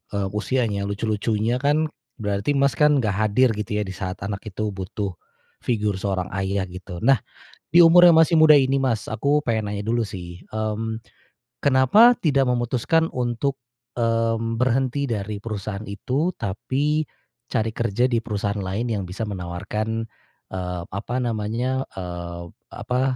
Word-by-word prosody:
eee, 100 Hz, -1 st, 0 dB
usianya 105 Hz, -2 st, -1 dB
lucu-lucunya 110 Hz, +3 st, -1 dB
kan, 150 Hz, +2 st, +1 dB, 0.2 s
berarti 105 Hz, +5 st, -1 dB
Mas 140 Hz, 0 st, +3 dB
kan 150 Hz, -4 st, +4 dB
nggak 105 Hz, -, +1 dB
hadir 110 Hz, +5 st, +3 dB
gitu 105 Hz, -1 st, -3 dB
ya 105 Hz, -, +1 dB
di 95 Hz, -, -6 dB
saat 95 Hz, 0 st, -4 dB
anak 100 Hz, +2 st, -5 dB
itu 105 Hz, +1 st, -3 dB
butuh, 95 Hz, +1 st, -4 dB, 0.5 s
figur 105 Hz, -5 st, -1 dB
seorang 95 Hz, -2 st, -2 dB
ayah 95 Hz, 0 st, 0 dB
gitu 90 Hz, +1 st, -8 dB
nah, 135 Hz, 0 st, +5 dB, 0.5 s
di 170 Hz, +3 st, +7 dB
umur 175 Hz, +2 st, +8 dB
yang 170 Hz, -, +7 dB
masih 160 Hz, 0 st, +5 dB
muda 155 Hz, -1 st, +8 dB
ini 135 Hz, -1 st, +3 dB
Mas, 125 Hz, -5 st, -1 dB
aku 145 Hz, +6 st, +1 dB
pengen 110 Hz, -4 st, -1 dB
nanya 100 Hz, -, -4 dB
dulu 115 Hz, +1 st, 0 dB
sih, 90 Hz, -3 st, -8 dB, 0.2 s
mmm, 110 Hz, +1 st, -2 dB, 0.5 s
kenapa 140 Hz, -, +6 dB
tidak 140 Hz, -4 st, +3 dB
memutuskan 125 Hz, +7 st, +1 dB
untuk, 125 Hz, +2 st, -1 dB, 0.4 s
mmm, 115 Hz, 0 st, 0 dB
berhenti 130 Hz, +2 st, +1 dB
dari 105 Hz, -1 st, -3 dB
perusahaan 105 Hz, -2 st, -5 dB
itu? 130 Hz, -, -1 dB
Tapi, 140 Hz, +10 st, -1 dB, 0.5 s
cari 110 Hz, -2 st, 0 dB
kerja 115 Hz, +1 st, 0 dB
di 120 Hz, -3 st, +1 dB
perusahaan 100 Hz, -2 st, -2 dB
lain 105 Hz, +5 st, -2 dB
yang 100 Hz, -2 st, -2 dB
bisa 105 Hz, +5 st, -4 dB
menawarkan, 105 Hz, +4 st, -3 dB, 0.5 s
eee, 90 Hz, -1 st, -3 dB
apa 105 Hz, +5 st, -5 dB
namanya, 120 Hz, +3 st, -1 dB
eee, 85 Hz, -2 st, -6 dB, 0.3 s
apa, 125 Hz, +1 st, -2 dB
110 Hz, 150 wpm, -23 LUFS, 100-130 Hz, 0.5 s, umur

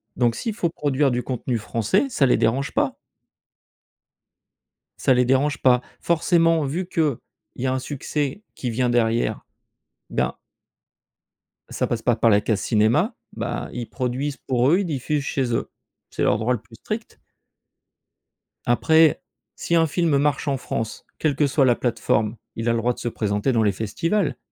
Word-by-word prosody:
Donc 120 Hz, -2 st, +2 dB
s'il 225 Hz, -, -3 dB
faut 175 Hz, -6 st, 0 dB
produire 145 Hz, -3 st, +1 dB
du 125 Hz, 0 st, -1 dB
contenu 125 Hz, -1 st, -2 dB
français, 115 Hz, -, 0 dB
ça 150 Hz, -, +2 dB
les 125 Hz, -, +3 dB
dérange 135 Hz, +5 st, 0 dB
pas! -, -, 0 dB, 2.0 s
Ça 130 Hz, -, +3 dB
les 125 Hz, 0 st, +3 dB
dérange 135 Hz, +3 st, +2 dB
pas. 125 Hz, -1 st, +4 dB, 0.2 s
Forcément, 165 Hz, -1 st, +3 dB
vu 170 Hz, +7 st, -3 dB
qu'il 155 Hz, -8 st, 0 dB, 0.4 s
y 130 Hz, -, -2 dB
a 130 Hz, -, +1 dB
un 130 Hz, -, 0 dB
succès 145 Hz, +6 st, -3 dB
qui 125 Hz, -, -3 dB
vient 125 Hz, +2 st, +1 dB
derrière, 115 Hz, -1 st, +1 dB, 0.7 s
ben -, -, 0 dB, 1.3 s
ça -, -, -1 dB
passe 115 Hz, -2 st, -2 dB
pas 120 Hz, 0 st, +2 dB
par 115 Hz, +1 st, +3 dB
la 105 Hz, -2 st, +5 dB
case 105 Hz, -2 st, 0 dB
cinéma, 120 Hz, -, +2 dB, 0.2 s
bah -, -, -4 dB
ils 120 Hz, -1 st, -5 dB
produisent 130 Hz, +3 st, -2 dB
pour 125 Hz, +1 st, +1 dB
eux, 175 Hz, -, +4 dB
ils 200 Hz, -, -1 dB
diffusent 150 Hz, -1 st, -2 dB
chez 130 Hz, -4 st, -1 dB
eux. -, -, -1 dB, 0.4 s
C'est -, -, -2 dB
leur 105 Hz, -, +3 dB
droit 115 Hz, +3 st, 0 dB
le 120 Hz, -, -3 dB
plus -, -, -17 dB
strict. -, -, -6 dB, 1.5 s
Après, 160 Hz, +6 st, +4 dB, 0.3 s
si 170 Hz, -, -1 dB
un 165 Hz, -1 st, +5 dB
film 160 Hz, -2 st, +1 dB
marche 145 Hz, +1 st, 0 dB
en 140 Hz, -1 st, +1 dB
France, 115 Hz, -3 st, -4 dB
quelle 150 Hz, -3 st, +1 dB
que 145 Hz, +1 st, +2 dB
soit 135 Hz, 0 st, +3 dB
la 120 Hz, -2 st, +4 dB
plateforme, 115 Hz, -2 st, 0 dB, 0.2 s
il 115 Hz, +1 st, -3 dB
a -, -, +4 dB
le 115 Hz, -, +1 dB
droit 120 Hz, +2 st, +1 dB
de -, -, -13 dB
se -, -, -4 dB
présenter 105 Hz, +1 st, 0 dB
dans 115 Hz, -3 st, +2 dB
les 105 Hz, -, +3 dB
festivals. 165 Hz, -, -1 dB
130 Hz, 170 wpm, -23 LUFS, 115-150 Hz, 2.0 s, la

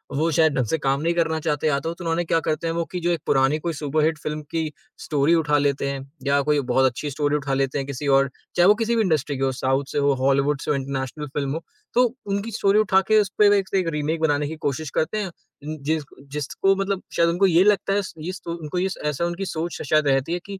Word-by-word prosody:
वो 160 Hz, +3 st, +1 dB
शायद 160 Hz, -1 st, +3 dB
ढंग 125 Hz, -3 st, +1 dB
से 160 Hz, -, 0 dB
काम 140 Hz, 0 st, 0 dB
नहीं 170 Hz, +1 st, +1 dB
करना 160 Hz, -2 st, +1 dB
चाहते 150 Hz, -1 st, -1 dB
या 140 Hz, -2 st, +2 dB
तो 165 Hz, +4 st, -3 dB
त 180 Hz, -, -14 dB
उन्होंने 165 Hz, 0 st, 0 dB
क्या 165 Hz, 0 st, +2 dB
करते 155 Hz, +2 st, -1 dB
हैं 165 Hz, -, -1 dB
वो 170 Hz, 0 st, 0 dB
कि 180 Hz, -, -3 dB
जो 175 Hz, +1 st, 0 dB
एक 170 Hz, -, 0 dB
पुरानी 135 Hz, +3 st, +3 dB
कोई 170 Hz, +1 st, -3 dB
सुपर 150 Hz, +1 st, -1 dB
हिट 160 Hz, -1 st, +1 dB
फिल्म 150 Hz, 0 st, -4 dB
की 160 Hz, -2 st, -1 dB, 0.3 s
स्टोरी 150 Hz, +2 st, +2 dB
उठा 150 Hz, -3 st, +2 dB
लेते 140 Hz, -1 st, 0 dB
हैं। 140 Hz, -1 st, -3 dB, 0.3 s
या 140 Hz, 0 st, +3 dB
कोई 150 Hz, -1 st, +4 dB
बहुत 130 Hz, +1 st, +4 dB
अच्छी 130 Hz, +3 st, -1 dB
स्टोरी 145 Hz, +1 st, 0 dB
उठा 140 Hz, -2 st, -2 dB
लेते 135 Hz, +1 st, 0 dB
हैं 135 Hz, 0 st, -3 dB
किसी 140 Hz, +1 st, -4 dB
और 135 Hz, 0 st, +4 dB, 0.3 s
चाहे 175 Hz, +1 st, +5 dB
वो 210 Hz, -, +7 dB
किसी 230 Hz, +1 st, 0 dB
भी 225 Hz, -, +3 dB
इंडस्ट्री 155 Hz, -7 st, 0 dB
की 135 Hz, -, -2 dB
हो, 135 Hz, -, +2 dB
साउथ 130 Hz, +2 st, 0 dB
से -, -, -3 dB
हो, 140 Hz, -1 st, +3 dB
हॉलीवुड 140 Hz, +1 st, +2 dB
से -, -, -1 dB
हो, -, -, +2 dB
इंटरनेशनल 135 Hz, +2 st, -4 dB
फिल्म 140 Hz, 0 st, -3 dB
हो। 165 Hz, -, -4 dB, 0.3 s
तो 250 Hz, +1 st, +5 dB, 0.2 s
उनकी 200 Hz, +3 st, -2 dB
स्टोरी 200 Hz, +1 st, +3 dB
उठा 195 Hz, -3 st, +4 dB
के 215 Hz, -, +7 dB
उस 200 Hz, -, -2 dB
पर 205 Hz, -1 st, +7 dB
एक 195 Hz, -2 st, +1 dB
से 195 Hz, -, +1 dB
एक 180 Hz, -, -2 dB
रीमेक 150 Hz, +2 st, -1 dB
बनाने 145 Hz, -2 st, +1 dB
की 160 Hz, -, -5 dB
कोशिश 150 Hz, +1 st, -3 dB
करते 185 Hz, +7 st, -1 dB
हैं। 205 Hz, -2 st, -1 dB, 0.4 s
उन 155 Hz, 0 st, -4 dB
जिस 155 Hz, +1 st, 0 dB, 0.3 s
जिसको 150 Hz, +7 st, 0 dB
मतलब 195 Hz, 0 st, -2 dB
शायद 170 Hz, 0 st, +4 dB
उनको 180 Hz, +4 st, +2 dB
ये 175 Hz, 0 st, +5 dB
लगता 200 Hz, -1 st, +2 dB
है, 205 Hz, -, +2 dB
इस 195 Hz, -, -5 dB
इस 185 Hz, -1 st, -5 dB
को 170 Hz, -, -4 dB
उनको 165 Hz, +1 st, -4 dB
इस 190 Hz, +1 st, -1 dB
ऐसा 150 Hz, +3 st, 0 dB
उनकी 175 Hz, +3 st, -3 dB
सोच 165 Hz, -1 st, -3 dB
श -, -, -4 dB
शायद 155 Hz, -1 st, +3 dB
रहती 135 Hz, +4 st, +1 dB
है 175 Hz, -, -1 dB
कि 200 Hz, -1 st, -7 dB
155 Hz, 270 wpm, -23 LUFS, 140-175 Hz, 0.4 s, वो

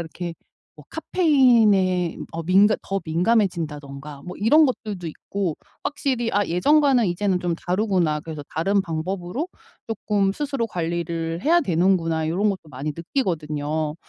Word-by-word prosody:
이렇게 170 Hz, +1 st, -5 dB, 0.4 s
뭐 -, -, -14 dB
카페인에 220 Hz, -, +3 dB, 0.2 s
어 165 Hz, 0 st, -4 dB
민감 195 Hz, +5 st, +4 dB
더 195 Hz, 0 st, -2 dB
민감해진다든가 155 Hz, -7 st, -1 dB
뭐 180 Hz, -, -7 dB
이런 295 Hz, +10 st, +5 dB
것들도 210 Hz, -9 st, -4 dB
있고 175 Hz, +1 st, -3 dB, 0.3 s
확실히 255 Hz, -5 st, -1 dB
'아 205 Hz, 0 st, +2 dB
예전과는 275 Hz, -, +3 dB
이제는 185 Hz, +1 st, 0 dB
좀 175 Hz, -1 st, -1 dB
다르구나. 180 Hz, -4 st, 0 dB
그래서 155 Hz, -1 st, -7 dB
다른 195 Hz, +5 st, +1 dB
방법으로 180 Hz, -, -3 dB, 0.4 s
쪼끔 205 Hz, -3 st, 0 dB
스스로 275 Hz, -1 st, -2 dB
관리를 170 Hz, -2 st, -3 dB
해야 340 Hz, +3 st, +4 dB
되는구나.' 165 Hz, -, +1 dB
요런 200 Hz, +5 st, +1 dB
것도 185 Hz, -6 st, -4 dB
많이 140 Hz, +3 st, -4 dB
느끼거든요. 155 Hz, -, -2 dB
180 Hz, 330 characters per minute, -23 LUFS, 165-215 Hz, 0.4 s, 이런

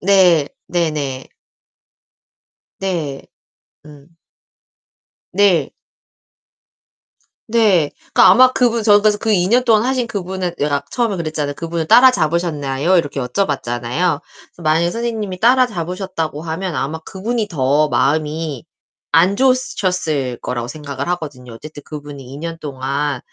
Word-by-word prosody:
네. 180 Hz, -6 st, +4 dB, 0.2 s
네네. 150 Hz, -6 st, -2 dB, 1.5 s
네. 165 Hz, -8 st, -3 dB, 0.6 s
음. 150 Hz, +2 st, -16 dB, 1.2 s
네. 195 Hz, -3 st, +3 dB, 1.8 s
네, 210 Hz, -9 st, +3 dB, 0.2 s
그러니까 -, -, +7 dB
아마 255 Hz, +1 st, +6 dB
그분 235 Hz, -2 st, +1 dB
저 205 Hz, -1 st, +5 dB
그래서 210 Hz, 0 st, +3 dB
그 220 Hz, +1 st, -1 dB
2 180 Hz, -2 st, +2 dB
년 245 Hz, +5 st, +3 dB
동안 220 Hz, -3 st, +4 dB
하신 255 Hz, -1 st, 0 dB
그분은 185 Hz, -3 st, -4 dB
내가 145 Hz, -1 st, 0 dB
처음에 230 Hz, -6 st, 0 dB
그랬잖아요. 155 Hz, -3 st, -3 dB
"그분을 165 Hz, 0 st, -4 dB
따라 255 Hz, +7 st, +7 dB
잡으셨나요?" 155 Hz, -, 0 dB
이렇게 145 Hz, -4 st, -1 dB
여쭤봤잖아요. 135 Hz, +1 st, -1 dB
그래서 -, -, -20 dB
만약에 160 Hz, +2 st, +2 dB
선생님이 220 Hz, -5 st, -3 dB
따라 255 Hz, +4 st, +5 dB
잡으셨다고 170 Hz, -5 st, -4 dB
하면 170 Hz, +1 st, -4 dB
아마 140 Hz, +5 st, -3 dB
그분이 215 Hz, +6 st, -3 dB
더 145 Hz, -1 st, +1 dB
마음이 150 Hz, +3 st, -1 dB, 0.5 s
안 175 Hz, +6 st, +4 dB
좋으셨을 180 Hz, -, 0 dB
거라고 120 Hz, -1 st, -3 dB
생각을 140 Hz, -2 st, -6 dB
하거든요. 140 Hz, -8 st, -5 dB
어쨌든 145 Hz, +5 st, -11 dB
그분이 145 Hz, -2 st, -9 dB
2 130 Hz, +2 st, -10 dB
년 165 Hz, +2 st, -5 dB
동안 140 Hz, -1 st, -3 dB
165 Hz, 280 characters per minute, -18 LUFS, 145-195 Hz, 1.8 s, 그러니까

